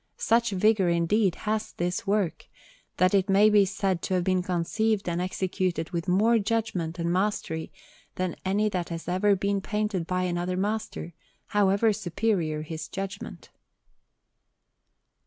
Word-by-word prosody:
Such 230 Hz, +1 st, +2 dB
vigour, 200 Hz, -1 st, +3 dB
indeed, 170 Hz, +3 st, +2 dB
has 215 Hz, 0 st, -1 dB
this 180 Hz, +6 st, -2 dB
work, 200 Hz, -4 st, 0 dB, 0.5 s
that 185 Hz, +1 st, +3 dB
it 195 Hz, -1 st, +2 dB
may 205 Hz, +2 st, +5 dB
be 205 Hz, -1 st, +6 dB
said 190 Hz, -2 st, -1 dB
to 190 Hz, -, -1 dB
have 180 Hz, -, +1 dB
been 185 Hz, 0 st, +1 dB
conceived 190 Hz, +4 st, 0 dB
and 170 Hz, 0 st, -1 dB
executed 185 Hz, -2 st, -2 dB
with 170 Hz, +1 st, -3 dB
more 220 Hz, +6 st, +4 dB
judgment 205 Hz, -6 st, -2 dB
and 170 Hz, 0 st, -1 dB
mastery 180 Hz, -4 st, -1 dB, 0.4 s
than 185 Hz, -1 st, -2 dB
any 200 Hz, +3 st, +1 dB
that 180 Hz, -4 st, -3 dB
has 165 Hz, -1 st, -6 dB
ever 190 Hz, +3 st, +3 dB
been 200 Hz, +1 st, -1 dB
painted 210 Hz, -4 st, -2 dB
by 185 Hz, 0 st, 0 dB
any 175 Hz, -1 st, -1 dB
other 180 Hz, +1 st, -2 dB
master, 205 Hz, -4 st, -3 dB, 0.4 s
however 205 Hz, +2 st, +3 dB
superior 175 Hz, -5 st, -1 dB
his 155 Hz, 0 st, -6 dB
judgment. 195 Hz, +2 st, -7 dB
190 Hz, 145 wpm, -27 LUFS, 175-210 Hz, 0.5 s, be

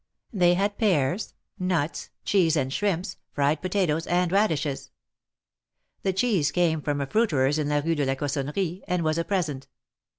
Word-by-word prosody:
They 175 Hz, -3 st, +4 dB
had 200 Hz, +2 st, -1 dB
pears, 185 Hz, -, +1 dB, 0.2 s
nuts, 175 Hz, -4 st, -1 dB, 0.2 s
cheese 175 Hz, -5 st, +3 dB
and 135 Hz, -2 st, -1 dB
shrimps, 195 Hz, 0 st, -1 dB, 0.2 s
fried 145 Hz, +1 st, +1 dB
potatoes 180 Hz, -4 st, 0 dB
and 175 Hz, 0 st, +1 dB
radishes. 160 Hz, -9 st, 0 dB, 1.1 s
The 190 Hz, -, +1 dB
cheese 190 Hz, -7 st, +1 dB
came 160 Hz, -1 st, +1 dB
from 145 Hz, -1 st, -1 dB
a -, -, 0 dB
fruiterer's 150 Hz, -, +2 dB
in 150 Hz, -1 st, -1 dB
la 145 Hz, 0 st, +2 dB
Rue 165 Hz, -, +2 dB
de 145 Hz, -3 st, 0 dB
la 135 Hz, 0 st, 0 dB
Cossonnerie, 150 Hz, +6 st, -2 dB
and 180 Hz, -1 st, 0 dB
was 155 Hz, +1 st, +1 dB
a -, -, +1 dB
present. 160 Hz, -9 st, -2 dB
165 Hz, 160 wpm, -26 LUFS, 145-185 Hz, 1.1 s, They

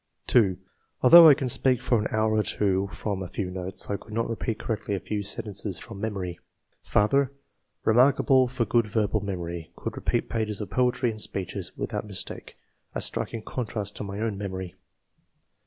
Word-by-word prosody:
2. 100 Hz, -7 st, +3 dB, 0.5 s
"Although 165 Hz, +5 st, +11 dB
I 145 Hz, -, +8 dB
can 130 Hz, -, -2 dB
speak 125 Hz, 0 st, +2 dB
for 120 Hz, -2 st, +2 dB
an 105 Hz, -, -1 dB
hour 110 Hz, 0 st, +1 dB
or 110 Hz, -, +3 dB
two 100 Hz, -2 st, 0 dB
from 100 Hz, -3 st, -3 dB
a 90 Hz, -, -4 dB
few 90 Hz, 0 st, -4 dB
notes, 90 Hz, 0 st, -3 dB
I 100 Hz, -, -1 dB
could 110 Hz, -, -13 dB
not 115 Hz, +1 st, 0 dB
repeat 115 Hz, -1 st, -3 dB
correctly 105 Hz, -3 st, -3 dB
a -, -, -2 dB
few 105 Hz, +2 st, -3 dB
sentences 100 Hz, -1 st, -3 dB
from 100 Hz, -4 st, -9 dB
memory. 95 Hz, -5 st, -3 dB, 0.4 s
''Father 135 Hz, +7 st, +2 dB, 0.3 s
— -, -, -46 dB
Remarkable 130 Hz, +2 st, +5 dB
for 125 Hz, -1 st, -1 dB
good 115 Hz, +1 st, +2 dB
verbal 105 Hz, 0 st, 0 dB
memory; 85 Hz, -4 st, -5 dB
could -, -, -5 dB
repeat -, -, -1 dB
pages 110 Hz, -2 st, -2 dB
of 100 Hz, -3 st, -6 dB
poetry 125 Hz, +2 st, +2 dB
and 110 Hz, -1 st, -7 dB
speeches, 95 Hz, -3 st, -4 dB
without -, -, -3 dB
mistake, 100 Hz, -3 st, -6 dB, 0.4 s
a -, -, 0 dB
striking 115 Hz, -2 st, -2 dB
contrast 105 Hz, -4 st, -4 dB
to -, -, -4 dB
my 100 Hz, 0 st, -5 dB
own 110 Hz, -3 st, -2 dB
memory." 95 Hz, -3 st, -5 dB
105 Hz, 180 wpm, -26 LUFS, 95-115 Hz, 0.5 s, Although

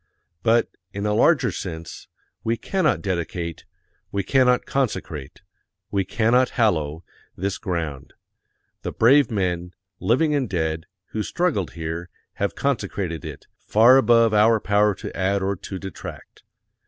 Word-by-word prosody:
But, 115 Hz, +4 st, +3 dB, 0.3 s
in 100 Hz, +1 st, -3 dB
a 105 Hz, -, +1 dB
larger 125 Hz, +1 st, +4 dB
sense, 85 Hz, -2 st, -7 dB, 0.4 s
we 115 Hz, +1 st, 0 dB
cannot 155 Hz, -, 0 dB
dedicate, 85 Hz, -3 st, -3 dB, 0.5 s
we 100 Hz, 0 st, -1 dB
cannot 125 Hz, +2 st, +3 dB
consecrate, 80 Hz, -, -3 dB, 0.5 s
we 100 Hz, -1 st, +1 dB
cannot 115 Hz, +6 st, +2 dB
hallow, 80 Hz, -, +1 dB, 0.3 s
this 100 Hz, +2 st, -3 dB
ground. 80 Hz, -7 st, -4 dB, 0.7 s
The -, -, -4 dB
brave 135 Hz, +5 st, +5 dB
men, 90 Hz, -4 st, -2 dB, 0.2 s
living 150 Hz, +7 st, +2 dB
and 135 Hz, -6 st, 0 dB
dead, 80 Hz, -3 st, -2 dB, 0.2 s
who 110 Hz, -, -2 dB
struggled 140 Hz, -, -1 dB
here, 85 Hz, +1 st, -5 dB, 0.3 s
have 100 Hz, -, 0 dB
consecrated 100 Hz, -, -2 dB
it, -, -, -8 dB
far 120 Hz, +5 st, +6 dB
above 115 Hz, -4 st, +4 dB
our 110 Hz, +2 st, +5 dB
power 105 Hz, 0 st, +2 dB
to -, -, -8 dB
add 95 Hz, +1 st, 0 dB
or 100 Hz, +1 st, 0 dB
to 95 Hz, +1 st, -7 dB
detract. 95 Hz, 0 st, -9 dB
100 Hz, 130 wpm, -23 LUFS, 85-120 Hz, 0.7 s, far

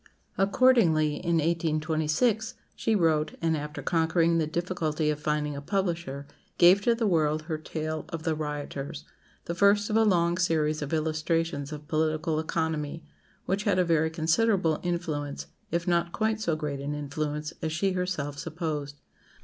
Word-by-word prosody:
Accordingly, 195 Hz, -7 st, +4 dB
in 170 Hz, -1 st, 0 dB
1826, 160 Hz, +6 st, +1 dB, 0.2 s
she 225 Hz, -, +1 dB
wrote, 160 Hz, -5 st, +2 dB
and 165 Hz, -1 st, +1 dB
after 150 Hz, 0 st, -5 dB
conquering 165 Hz, 0 st, +2 dB
the 155 Hz, -, 0 dB
difficulty 160 Hz, -2 st, -1 dB
of 150 Hz, -, -4 dB
finding 150 Hz, -1 st, -1 dB
a 140 Hz, -, -5 dB
publisher, 170 Hz, -5 st, -2 dB, 0.3 s
gave 180 Hz, +3 st, +7 dB
to 235 Hz, +3 st, +3 dB
the 230 Hz, -1 st, -1 dB
world 155 Hz, -5 st, +2 dB
her 155 Hz, -1 st, -4 dB
tale 155 Hz, 0 st, -4 dB
of 165 Hz, -1 st, -5 dB
"The 165 Hz, -2 st, +1 dB
Rioters," 150 Hz, -1 st, -5 dB, 0.4 s
the 170 Hz, -, -3 dB
first 200 Hz, +3 st, +3 dB
of -, -, +1 dB
a 225 Hz, -, +5 dB
long 175 Hz, -4 st, +2 dB
series 155 Hz, -4 st, +1 dB
of 145 Hz, -, -4 dB
illustrations 155 Hz, -2 st, -1 dB
of 150 Hz, -1 st, -8 dB
political 155 Hz, +1 st, 0 dB
economy, 160 Hz, -1 st, -2 dB, 0.4 s
which 200 Hz, +2 st, -1 dB
had 200 Hz, -3 st, +2 dB
a 180 Hz, -, +3 dB
very 160 Hz, -1 st, +2 dB
considerable 165 Hz, +1 st, +2 dB
influence, 160 Hz, -5 st, -3 dB, 0.2 s
if 170 Hz, +1 st, -2 dB
not 170 Hz, -1 st, +1 dB
quite 220 Hz, 0 st, 0 dB
so 170 Hz, -7 st, +1 dB
great 150 Hz, -3 st, -3 dB
an 145 Hz, +2 st, -3 dB
influence, 150 Hz, +1 st, -3 dB
as 160 Hz, -, -2 dB
she 190 Hz, +5 st, 0 dB
herself 180 Hz, -6 st, -2 dB
supposed. 155 Hz, -3 st, -4 dB
160 Hz, 155 wpm, -28 LUFS, 150-175 Hz, 0.4 s, gave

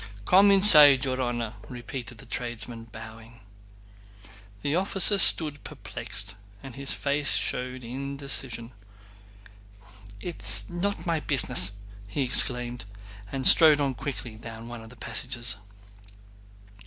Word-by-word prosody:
'" 100 Hz, -, -19 dB
"Come 195 Hz, -, +4 dB
inside, 150 Hz, -9 st, +5 dB
your 130 Hz, 0 st, -3 dB
honor!" 120 Hz, -3 st, -4 dB, 0.2 s
repeated 120 Hz, -1 st, -9 dB
the -, -, -13 dB
tradesman, 120 Hz, -1 st, -6 dB
bowing. 115 Hz, +1 st, -14 dB, 1.2 s
The 145 Hz, +2 st, -2 dB
officer 195 Hz, +2 st, +2 dB
stood 150 Hz, -5 st, +4 dB
perplexed 100 Hz, 0 st, -6 dB, 0.3 s
and 135 Hz, -2 st, -11 dB
his 135 Hz, +2 st, 0 dB
face 140 Hz, 0 st, +1 dB
showed 125 Hz, 0 st, -4 dB
indecision. 135 Hz, -2 st, -3 dB, 1.5 s
"It's 170 Hz, +9 st, -3 dB
not 195 Hz, +4 st, -5 dB
my 165 Hz, -2 st, -2 dB
business!" 125 Hz, -10 st, +3 dB, 0.4 s
he 135 Hz, +7 st, -4 dB
exclaimed, 125 Hz, -2 st, +5 dB, 0.5 s
and 135 Hz, -1 st, -5 dB
strode 155 Hz, -3 st, +7 dB
on 140 Hz, -2 st, -2 dB
quickly 120 Hz, -3 st, -8 dB
down 115 Hz, +1 st, -12 dB
one 120 Hz, -1 st, -10 dB
of 110 Hz, -, -14 dB
the 125 Hz, -, -16 dB
passages. 120 Hz, 0 st, -3 dB
125 Hz, 115 wpm, -25 LUFS, 115-145 Hz, 1.5 s, strode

